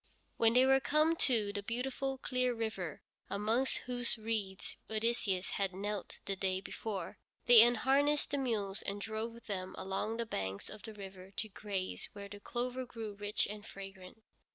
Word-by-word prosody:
When 230 0 +5
they 250 +2 +7
were 270 0 +6
come 305 +4 +3
to 220 -9 +4
the 205 - -2
beautiful, 265 +5 -2
clear 255 -1 +1
river, 205 -9 -3 0.3
amongst 220 +6 +1
whose 245 -1 +2
reeds 215 -4 -2
Odysseus 220 -4 +1
had 195 -2 0
knelt 205 0 -4
the 195 - -1
day 190 0 0
before, 200 +1 -5 0.3
they 240 -2 +10
unharnessed 270 +5 +4
the 285 - +1
mules 210 -6 -1
and 200 +1 -3
drove 225 +2 -4
them 185 -3 -4
along 195 +4 -2
the 235 - -1
banks 95 - -3
of 215 - -9
the 220 -2 -8
river 190 -2 -9
to 220 - -2
graze 195 -2 -4
where 200 -1 -7
the 205 0 -8
clover 250 +4 -2
grew 225 -4 -6
rich 205 +1 0
and 210 +1 -7
fragrant. 195 +2 -10
220 Hz, 165 wpm, -34 LUFS, 195-245 Hz, 0.3 s, they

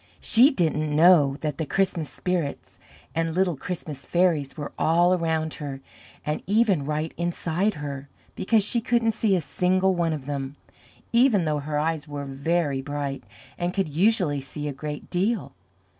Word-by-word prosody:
She 245 +5 +5
didn't 155 - 0
know 155 -4 +6
that 150 -3 -3
the 160 - -1
Christmas 180 -5 0
spirits 175 -6 -3 0.3
and 165 0 -1
little 185 -2 +2
Christmas 150 -2 -6
fairies 170 -5 +1
were 145 - -5
all 175 +3 +3
around 160 -3 0
her 140 -2 -5 0.5
and 150 0 -2
even 200 -8 +2
right 155 +1 -2
inside 175 +3 -1
her, 140 -1 -6 0.2
because 215 +2 +2
she 230 +3 +1
couldn't 235 0 +2
see 215 -2 +1
a 180 - 0
single 185 +5 +1
one 170 -2 0
of 150 -4 -4
them, 140 -1 -4 0.6
even 235 -7 +4
though 150 -1 0
her 150 +1 -3
eyes 155 0 -1
were 145 -1 -5
very 140 +1 -1
bright 145 0 -4 0.4
and 175 +1 -2
could 190 -7 -1
usually 175 -5 +2
see 145 +2 -6
a 145 - -3
great 150 +2 -7
deal. 195 +4 0
160 Hz, 160 wpm, -25 LUFS, 145-185 Hz, 0.6 s, know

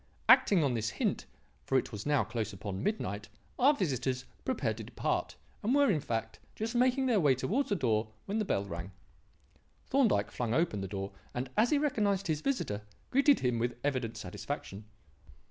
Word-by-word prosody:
Acting 185 -6 +6
on 135 -3 +1
this 115 -1 -1
hint - - -1 0.4
for 135 - +2
it - - -1
was 105 +1 -6
now 145 -5 +3
close 110 0 -3
upon 95 0 -5
midnight 105 - -2 0.3
our 270 +4 +7
visitors 130 - -1 0.2
prepared 130 - -1
to 115 - -6
depart; - - -2 0.3
and 235 +6 +2
were, 285 -5 +5
in 160 - +1
fact, 115 -5 -3 0.2
just 225 +2 -3
making 255 +2 +3
their 235 -5 +3
way 145 -6 +4
towards 230 - 0
the 205 - +2
door 115 - +1 0.2
when 205 +3 -1
the 215 - 0
bell 100 - 0
rang. 85 0 -6 0.9
Thorndyke 215 - +2
flung 120 -1 -1
open 160 - +1
the 95 - -3
door, 95 0 -4 0.2
and, 125 +1 -3
as 235 +3 +4
he 300 - +3
recognized 210 -9 +1
his 155 -2 -1
visitor, 135 - -1 0.3
greeted 275 +1 +5
him 125 -2 +1
with 120 +1 -1
evident 130 -5 -1
satisfaction. 100 0 -6
130 Hz, 180 wpm, -31 LUFS, -, 0.9 s, our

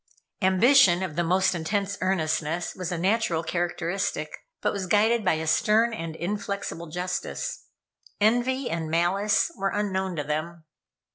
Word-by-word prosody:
Ambition 190 0 +5
of 175 -5 -4
the 175 - +1
most 185 +3 +2
intense 200 +4 -2
earnestness 165 -2 -1
was 185 -1 -5
a 175 - -2
natural 185 -2 +1
characteristic, 175 +2 -2 0.3
but - - 0
was 195 -2 -3
guided 220 +4 +3
by 185 - +3
a 160 0 -2
stern 220 +8 +3
and 165 -6 -5
inflexible 200 -1 -4
justice. 180 - -4 0.5
Envy 245 +5 +2
and 165 -1 -3
malice 190 - +2
were 195 - -1
unknown 190 -3 -2
to 150 - -2
them. 155 +3 -4
185 Hz, 140 wpm, -26 LUFS, 170-205 Hz, 0.5 s, Ambition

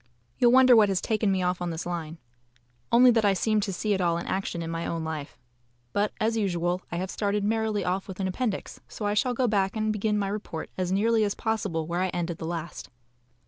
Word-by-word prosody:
You'll 240 -1 +5
wonder 255 -1 +7
what 215 -3 +6
has 190 -2 +1
taken 215 -2 0
me 190 -1 0
off 180 0 -1
on 175 - -1
this 165 0 -4
line. 165 -2 -4 0.7
Only 245 +1 +7
that 225 -2 +2
I 200 -1 +4
seem 215 +2 +1
to 200 -1 -2
see 205 +3 -1
it 190 - 0
all 170 -1 +2
in 170 - -5
action 185 -3 -2
in 165 - -4
my 165 0 -3
own 165 -1 -3
life. 155 -3 -5 0.6
But, 205 +1 +1
as 225 +1 +1
usual, 180 -4 0
I - - -3
have 185 +2 -3
started 205 -1 -1
merrily 215 -2 0
off 185 +2 -1
with 190 -1 -8
an 190 - 0
appendix, 205 +2 -3
so 210 - -6
I 205 - +1
shall 245 +4 +1
go 250 +1 +1
back 200 -2 +1
and 215 0 0
begin 210 0 0
my 200 -1 -1
report 200 -6 -5
as 185 -1 -2
nearly 220 +3 +3
as 205 -1 0
possible 200 -8 -2
where 170 +2 -2
I 185 - +2
ended 175 -1 -3
the 160 - -4
last. 170 0 -5
195 Hz, 235 wpm, -27 LUFS, 175-215 Hz, 0.7 s, wonder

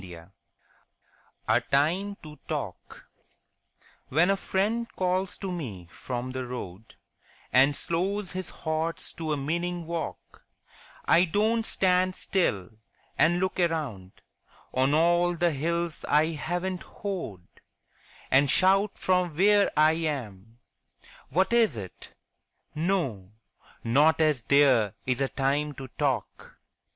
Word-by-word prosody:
33 85 -2 -11 1.2
A - - +3
TIME 175 +9 0
TO 150 -1 -10
TALK - - -6 1.0
When 170 +7 +3
a - - +3
friend 210 +5 -1
calls 185 0 -1
to 195 -2 -5
me 105 - -6
from 125 +4 -5
the 130 0 -4
road 110 -4 -8 0.6
And 135 +3 +5
slows 185 +5 -1
his 185 0 -3
horse 160 +1 -3
to 160 -2 -4
a 150 - 0
meaning 170 +4 -2
walk, 170 0 -6 0.6
I 175 - +5
don't 215 +6 +1
stand 185 0 +2
still 100 - -1 0.4
and 175 +2 +3
look 185 0 -2
around 145 - -2 0.6
On 135 +3 +2
all 175 +2 +3
the 170 0 +1
hills 170 +3 -2
I 155 +2 +3
haven't 175 +4 -3
hoed, 170 - -6 0.9
And 135 +1 +4
shout 195 +6 +3
from 180 -4 0
where 205 +2 +4
I 155 +1 +6
am, 120 - -4 0.7
What 190 - +1
is 225 - +3
it? 95 -4 -9 0.6
No, 150 - -2 0.5
not 145 +8 +3
as 155 -5 +2
there 130 -6 +3
is 125 +1 -1
a 135 - +1
time 145 +2 -1
to 135 -1 -8
talk. - - -3
160 Hz, 120 wpm, -27 LUFS, 130-185 Hz, 1.2 s, I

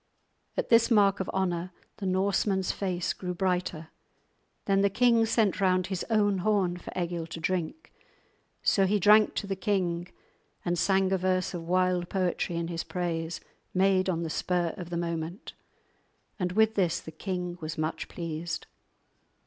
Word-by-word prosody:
At - - -1
this 230 0 +5
mark 200 -4 +4
of 190 - -3
honour 180 -2 -1 0.3
the 195 - -3
Norseman's 190 0 +1
face 180 -3 -2
grew 180 -1 -5
brighter. 180 -3 -1 0.8
Then 195 -1 +3
the 200 - +4
king 230 +2 +3
sent 215 -3 +1
round 185 -1 +3
his 190 -2 -3
own 205 -3 +2
horn 185 -2 +1
for 175 - -9
Egil 170 -2 -2
to 165 0 -7
drink; 180 - -3 0.7
so 195 -1 +3
he 210 +2 +2
drank 210 +3 +5
to - - -2
the 195 -1 -2
king 180 -3 -1 0.6
and 175 0 +1
sang 190 +2 +2
a 190 - +2
verse 185 0 0
of 165 -2 -6
wild 180 0 +1
poetry 180 -2 -1
in 170 0 -2
his 170 -1 -3
praise, 165 -1 -3 0.3
made 190 0 +3
on 170 -2 -1
the 160 - -3
spur 175 -1 0
of 175 -2 -7
the 175 - -3
moment; 170 +2 -4 0.9
and 180 -1 -1
with 220 +2 +4
this 185 -4 +1
the 160 - -10
king 180 +1 -4
was 155 0 -5
much 155 +1 -2
pleased. 165 -1 -5
185 Hz, 165 wpm, -28 LUFS, 170-195 Hz, 0.9 s, this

